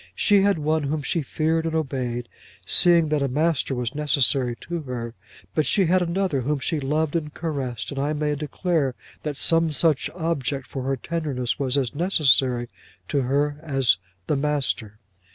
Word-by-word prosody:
She 205 -2 +4
had 200 -1 +3
one 155 +1 +1
whom 150 +1 -2
she 165 - 0
feared 160 +3 0
and 160 - -2
obeyed, 125 -5 -2 0.4
seeing 170 -3 +5
that 150 -1 +1
a 140 - +1
master 145 0 0
was 125 -1 -2
necessary 140 -4 +1
to 170 -1 -4
her; 120 -4 -5 0.4
but 155 - +1
she 195 - +4
had 180 +2 +3
another 175 -4 0
whom 145 +4 0
she 155 +3 -1
loved 150 +3 -1
and 150 -3 -1
caressed, 140 -8 -3
and 140 - -4
I 145 +2 0
may 150 0 0
declare, 150 -2 -1 0.3
that 150 -2 -4
some 165 0 +2
such 150 0 +1
object 145 -6 -2
for 135 - -6
her 135 0 0
tenderness 140 -5 -2
was 135 -1 0
as 130 -4 0
necessary 135 -7 +2 0.4
to 140 - +1
her 145 +3 0
as 135 - +2 0.3
the 150 - 0
master. 140 -7 -1
145 Hz, 170 wpm, -24 LUFS, 130-160 Hz, 0.4 s, seeing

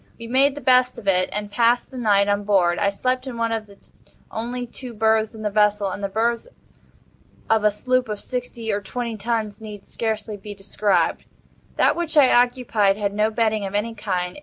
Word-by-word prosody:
We 230 - -9
made 270 +4 +3
the 290 - -7
best 255 -1 +4
of 205 - -10
it, 185 -1 +3
and 210 0 -4
passed 235 +4 +2
the 260 - -8
night 205 -3 +3
on 205 0 +1
board. 185 -4 +2
I 200 - +2
slept 255 +6 -2
in 245 -3 -6
one 230 0 0
of 220 -1 -3
the 200 -1 -17 0.5
only 245 +2 -4
two 245 0 -9
berths 220 +1 +2
in 220 - -8
the 210 - -1
vessel—and 205 -1 +1
the 200 - -1
berths 230 - 0 1.0
of 220 -1 +2
a 210 - +5
sloop 255 +3 0
of 210 -1 -3
sixty 245 -3 -4
or 205 0 -1
twenty 235 +3 -4
tons 220 0 -3
need 210 -2 -9
scarcely 220 -1 -3
be 205 +1 -9
described. 195 -3 0 0.5
That - - +3
which 335 -2 -2
I 275 -3 +6
occupied 240 -5 +2
had 200 -1 -1
no 210 +1 +2
bedding 220 -1 0
of 195 0 -4
any 220 +3 -1
kind. 190 0 -3
220 Hz, 200 wpm, -22 LUFS, 205-240 Hz, 1.0 s, I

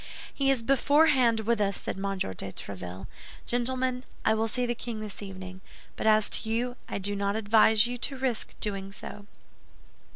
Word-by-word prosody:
'" - - -12
"He 275 -1 +1
is 265 -4 +2
beforehand 270 -3 +4
with 225 0 +1
us," 200 -1 0
said - - -3
M. 195 0 -2
de - - -1
Tréville. 95 -1 -6 0.4
"Gentlemen, 250 +1 0 0.2
I - - +5
will 220 +1 +1
see 250 +2 0
the 240 - 0
king 235 -1 -5
this 215 -1 -7
evening; 185 -1 -8 0.3
but - - -2
as 215 -1 +5
to 220 - 0
you, 245 +2 0
I - - -2
do 200 +1 -2
not 200 0 0
advise 220 0 +5
you 245 0 -3
to 275 +2 -2
risk 255 -4 -2
doing 195 -2 -2
so." 205 +1 -9
220 Hz, 185 wpm, -28 LUFS, 200-245 Hz, 0.4 s, I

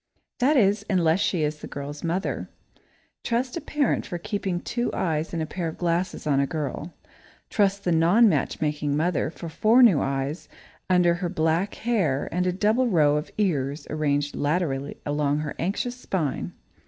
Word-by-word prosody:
That 275 +4 +3
is, 205 -2 +3
unless 170 -3 +3
she 175 -5 +1
is 150 0 -2
the - - -8
girl's 145 +1 -7
mother. 175 +4 -2 0.7
Trust 245 +2 -1
a 335 - -3
parent 295 -4 0
for 175 - -5
keeping 195 -1 -2
two 240 +6 -2
eyes 160 -2 -1
and 165 -2 -2
a - - -2
pair 170 +1 -4
of 160 - -6
glasses 175 +1 -1
on 140 -2 +2
a 140 - +2
girl! 155 +2 -4 0.6
Trust 200 -1 +1
the 180 - +1
non 175 +8 +5
matchmaking 150 -6 0
mother 165 0 0
for 170 +1 -8
four 220 +10 +4
new 195 -12 +6
eyes 135 +4 -3 0.4
under 180 -2 +4
her 175 0 -3
back 165 +2 0
hair 190 - 0
and 180 +2 0
a - - +2
double 215 +7 +2
row 150 -8 +3
of 150 +1 -2
ears 150 -8 0
arranged 145 -1 0
laterally 145 -3 -1
along 145 0 0
her 150 -2 -4
anxious 240 +7 -2
spine! 170 - -2
170 Hz, 170 wpm, -25 LUFS, 150-200 Hz, 0.7 s, new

